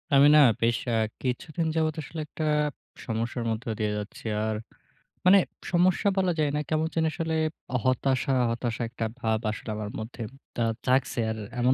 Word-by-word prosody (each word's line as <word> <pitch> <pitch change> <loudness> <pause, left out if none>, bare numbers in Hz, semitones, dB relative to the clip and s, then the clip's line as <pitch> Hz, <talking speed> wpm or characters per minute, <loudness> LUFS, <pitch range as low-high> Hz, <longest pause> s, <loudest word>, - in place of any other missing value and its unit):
আমি 140 +1 +8
না - - +9 0.2
বেশ 115 0 +3
অ্যা 120 - +1 0.3
কিছুদিন 155 +6 -2
যাবত 155 -1 +1
আসলে 160 +3 -7
একটা 155 - -4 0.6
সমস্যার 115 +1 -2
মধ্যে 110 +1 -3
দিয়ে 105 -1 +1
যাচ্ছি। 105 +2 -7 0.2
আর 110 0 0 0.7
মানে 195 +2 +8 0.3
সমস্যা 180 +3 +3
বলা 185 -2 +3
যায় 150 -1 +3
না। - - +1
কেমন 155 0 +1
যেন 160 -1 +2
আসলে 160 0 -2 0.5
হতাশা, 130 +1 +2 0.2
হতাশা 120 0 -2
একটা 115 -1 -3
ভাব 110 -2 +1
আসলে 110 - -7
আমার 105 -1 -4
মধ্যে 115 +2 -7 0.3
দা 120 - 0 0.2
জাগছে। 130 -1 +2
আর 110 - -4 0.2
এমন 125 +2 +4
130 Hz, 165 wpm, -27 LUFS, 115-160 Hz, 0.7 s, না